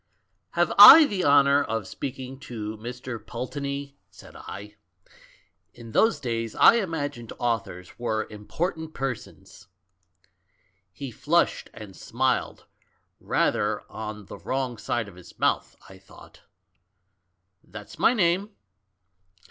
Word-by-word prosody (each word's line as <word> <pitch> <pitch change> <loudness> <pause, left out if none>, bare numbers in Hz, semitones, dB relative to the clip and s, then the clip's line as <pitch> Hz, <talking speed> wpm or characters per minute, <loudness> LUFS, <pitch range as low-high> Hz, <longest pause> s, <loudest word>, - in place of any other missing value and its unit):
" - - -49
'Have - - +1
I 320 -1 +12
the 200 -8 -2
honour 140 0 +5
of 110 -5 -4
speaking 130 +3 -7
to 110 -6 -6
Mr. 120 0 -7
Pul 125 - -6
teney?' 140 0 -5 0.2
said - - -16
I. 105 +2 -9 1.0
In 115 -1 -11
those 225 - +2
days 115 -3 -4
I 235 - +7
imagined 145 - -4
authors 110 -7 -4
were 110 -2 -1
important 160 - -5
persons. 135 -7 -7 1.2
"He 135 +7 -8
flushed, 165 +9 0
and 100 -3 -11
smiled 130 +3 -2 0.3
— - - -48
rather - - 0
on 105 -1 -7
the - - -11
wrong 130 -3 -3
side 120 -3 -2
of 100 - -12
his 90 - -15
mouth, - - 0
I 95 0 -14
thought. 95 - -17 1.2
'That's 105 - -12
my 235 +7 +4
name.' 190 0 +1
125 Hz, 125 wpm, -25 LUFS, 110-145 Hz, 1.2 s, I